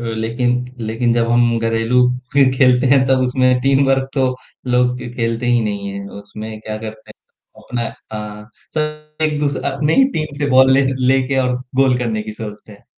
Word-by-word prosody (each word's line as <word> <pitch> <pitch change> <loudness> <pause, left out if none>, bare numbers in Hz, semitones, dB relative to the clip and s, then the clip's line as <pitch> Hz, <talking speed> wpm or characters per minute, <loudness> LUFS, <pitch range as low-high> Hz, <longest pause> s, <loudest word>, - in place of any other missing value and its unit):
लेकिन 120 +2 -1 0.2
लेकिन 115 +2 0
जब 115 -1 +1
हम 120 -1 +3
घरेलू 115 +2 +1 0.3
फ़िर 140 -2 +5
खेलते 125 -1 +4
हैं 130 0 +4
तब 130 0 +3
उसमें 130 0 +2
टीम 135 0 +3
वर्क 135 0 +1
तो 135 -2 +2 0.5
लोग 125 0 +2
क 120 - -7
खेलते 115 0 -1
ही 120 -1 +3
नहीं 100 -1 -3
हैं, 100 0 -6
उसमें 110 +1 -9
क्या 110 0 -5
करते 110 0 -9
हैं - - -21
अपना 120 -1 -3 0.6
अ, 105 - -17 0.3
सब 150 0 -4
एक 150 -1 +1
दूस 145 -1 0 0.2
अपनी 150 +3 0
ही 270 - +6
टीम 155 -2 -3
से 145 - 0
बॉल 130 0 +6
ले 135 +1 +4 0.2
लेके 135 +1 +2
और 125 - 0 0.3
गोल 130 -2 +2
करने 110 -3 -2
की 110 0 -7
सोचते 105 -1 -9
हैं, 100 - -18
125 Hz, 190 wpm, -18 LUFS, 115-135 Hz, 0.6 s, ही